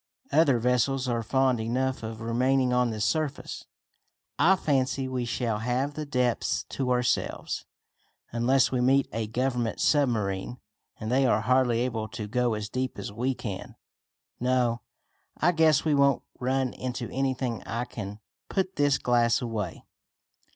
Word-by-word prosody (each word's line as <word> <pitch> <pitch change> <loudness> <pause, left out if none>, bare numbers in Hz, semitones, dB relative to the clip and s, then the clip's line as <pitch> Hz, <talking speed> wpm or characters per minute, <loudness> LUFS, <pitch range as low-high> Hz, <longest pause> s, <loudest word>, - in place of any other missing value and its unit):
Other 150 -6 +4
vessels 125 +2 +1
are 120 -1 0
fond 130 +1 +2
enough 130 +4 -1
of 110 0 -6
remaining 125 +3 +2
on 125 -1 +3
the 110 -1 -4
surface. 155 +7 -2 0.7
I 180 +6 +6
fancy 135 -5 0
we 130 -2 -2
shall 115 -2 -1
have 125 +5 -1
the 150 0 -5
depths 125 -3 0
to 130 -2 -2
ourselves, 125 -1 0 0.7
unless 120 +3 +3
we 125 -1 +1
meet 135 +2 +3
a 115 -1 -2
Government 120 0 -1
submarine, 115 -6 +1 0.4
and 110 +1 -4
they 130 +1 +3
are - - +3
hardly 125 -2 +2
able 115 -3 -2
to 110 -2 -6
go 120 +1 +1
as 105 -1 -4
deep 130 +3 -3
as 100 - -5
we 125 +4 -1
can. 100 -7 -6 0.6
No, 125 -2 +1 0.6
I 175 - +3
guess 160 -3 +3
we 155 - +3
won't 140 -1 +3 0.2
run 130 0 0
into 125 -2 -4
anything 130 -3 -1
and - - -14
I 115 +3 -2
can 105 -3 -7 0.3
put 190 -1 -1
this 145 -1 +3
glass 120 -1 +2
away." 110 -7 -4
125 Hz, 150 wpm, -27 LUFS, 115-135 Hz, 0.7 s, I